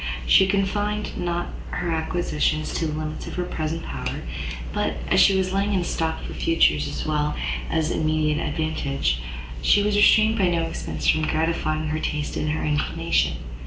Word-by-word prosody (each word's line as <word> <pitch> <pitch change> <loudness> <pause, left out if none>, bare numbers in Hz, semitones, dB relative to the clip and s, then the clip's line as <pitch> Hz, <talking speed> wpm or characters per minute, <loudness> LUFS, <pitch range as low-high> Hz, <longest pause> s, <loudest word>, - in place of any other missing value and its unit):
She 190 - +6
confined 205 +2 -1
not 175 0 -2 0.2
her 175 - -2
acquisitions 160 -1 -1
to 165 - -1
the 155 - -3
limits 155 0 -5
of - - -6
her 180 - -1
present 160 -1 -3
power, 65 -1 -4 0.5
but, - - 0
as - - +4
she 195 -1 +6
was 190 0 0
laying 200 +1 +1
in 190 - +2
a - - -1
stock 160 -1 -2
for - - -6
future 165 - +3
as 70 0 -3
well 150 -1 0 0.3
as 160 0 0
immediate 155 -1 +1
advantage, 140 - -1 0.4
she 200 - +4
was 210 0 +1
restrained 215 +2 +5
by 190 - +4
no 170 -1 +1
expence 165 - -4
from 155 0 +3
gratifying 155 -1 0
her 155 +1 -1
taste 150 -1 -2
and 155 - -1
her 155 - -1
inclination. 150 0 +1
160 Hz, 175 wpm, -24 LUFS, 155-185 Hz, 0.5 s, She